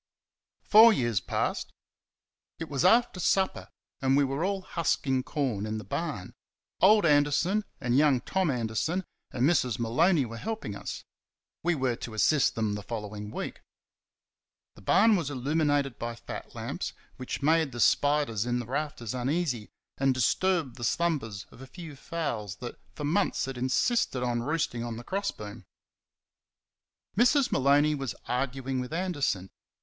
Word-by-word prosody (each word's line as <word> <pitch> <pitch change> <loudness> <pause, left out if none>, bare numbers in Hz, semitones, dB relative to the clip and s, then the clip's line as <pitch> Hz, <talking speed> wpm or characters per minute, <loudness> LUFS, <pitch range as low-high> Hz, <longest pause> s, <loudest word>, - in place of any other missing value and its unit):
Four 225 +2 +8
years 120 - +1
passed. - - -2 0.9
It 165 - -6
was 140 0 -1
after 225 +1 +4
supper, 190 +2 +1 0.3
and 135 0 +3
we 145 - +4
were 135 +4 -1
all 195 0 -1
husking 140 -7 0
corn 125 -7 -2
in 110 0 -3
the 110 - -6
barn. 100 - -4 0.5
Old 210 +1 +6
Anderson 150 +7 +3
and 125 0 0
young 140 -2 +4
Tom 190 -3 0
Anderson 125 - -1 0.3
and 130 +2 +1
Mrs. 130 -9 +2
Maloney 130 +7 +2
were 115 0 -7
helping 215 - -4
us. - - -6 0.6
We 175 +1 +1
were 130 -4 0
to 110 - -7
assist 140 +6 +3
them 110 -2 0
the 105 - -4
following 105 -1 -6
week. - - -6 1.1
The - - -16
barn 215 - +5
was 165 -7 -1
illuminated 145 0 0
by 120 0 -4
fat - - -9
lamps, - - -4 0.2
which 130 +2 -5
made 160 -1 +3
the 120 - -7
spiders 145 -5 +2
in 120 0 0
the 120 - -3
rafters 135 -3 -3
uneasy 130 -2 -1 0.3
and 135 -1 +2
disturbed 155 +2 +1
the 120 - -7
slumbers 115 - -1
of 115 - -15
a 135 - -9
few 160 0 -10
fowls 120 - -4
that 120 +2 -8 0.2
for 150 - -6
months 170 +8 +1
had 135 0 -5
insisted 130 - +1
on 120 -1 0
roosting 140 -4 -1
on 120 -1 -5
the 120 - -8
cross 200 +7 -2
beam. 105 -1 -8 1.5
Mrs. 250 +5 +4
Maloney 145 +3 +4
was 135 -6 -4
arguing 130 +1 -2
with 125 +1 -5
Anderson. 145 - -1
135 Hz, 155 wpm, -28 LUFS, 120-165 Hz, 1.5 s, Four